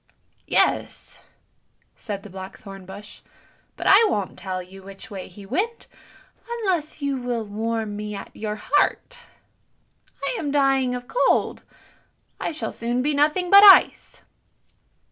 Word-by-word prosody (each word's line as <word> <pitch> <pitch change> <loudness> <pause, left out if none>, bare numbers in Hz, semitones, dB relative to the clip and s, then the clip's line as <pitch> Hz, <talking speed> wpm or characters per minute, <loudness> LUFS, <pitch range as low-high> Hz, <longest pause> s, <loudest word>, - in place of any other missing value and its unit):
" - - -42
"Yes," - - 0 0.8
said 200 -3 -6
the 210 - -11
blackthorn 190 0 -10
bush; 205 +2 -11 0.6
"but - - -6
I 400 +4 +7
won't 200 - -2
tell 185 -1 -5
you 190 +2 -14
which 195 +2 -12
way 195 -2 -7
he 195 +2 -13
went 400 - -2 0.6
unless 370 -10 -2
you 280 -1 -1
will 245 -3 -3
warm 220 0 -3
me 210 0 -5
at 200 - -9
your 210 -1 -4
heart. 295 - 0 1.1
I - - -1
am 295 - -3
dying 270 -3 +2
of 245 0 -7
cold; - - +1 0.8
I - - -2
shall 310 - -5
soon 240 +2 -2
be 295 +2 0
nothing 305 +5 +1
but 400 +1 +9
ice." 395 -2 +6
240 Hz, 140 wpm, -23 LUFS, 205-300 Hz, 1.1 s, but